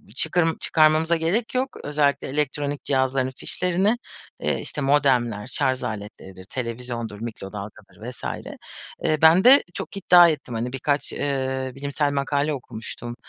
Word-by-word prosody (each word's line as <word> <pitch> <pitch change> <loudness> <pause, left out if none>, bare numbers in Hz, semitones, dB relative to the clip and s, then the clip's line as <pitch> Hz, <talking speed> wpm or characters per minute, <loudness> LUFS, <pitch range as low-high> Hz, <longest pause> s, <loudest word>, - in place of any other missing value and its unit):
çıkar 165 +3 +2
çıkarmamıza 160 +1 +3
gerek 195 +10 -1
yok, 260 +1 -1
özellikle 145 -1 +1
elektronik 145 0 -2
cihazların 130 -1 0
fişlerini." 185 +5 +1 0.4
Eee, - - -1
işte, 150 - -5
modemler, 130 -6 +2
şarj 130 0 0
aletleridir, 100 -3 -7
televizyondur, 115 -3 -5
mikrodalgadır 105 0 -8
vs. 125 - -10 0.8
Eee, 155 -1 +2
ben 160 +4 +6
de 265 +3 +8
çok - - -6
iddia 175 -3 +7
ettim 150 -6 -4
hani 120 +3 -3
birkaç, 140 +2 0
eee, 130 -2 -2
bilimsel 140 +1 -1
makale 145 +2 0
okumuştum, 120 -2 -7
140 Hz, 125 wpm, -23 LUFS, 120-155 Hz, 0.8 s, de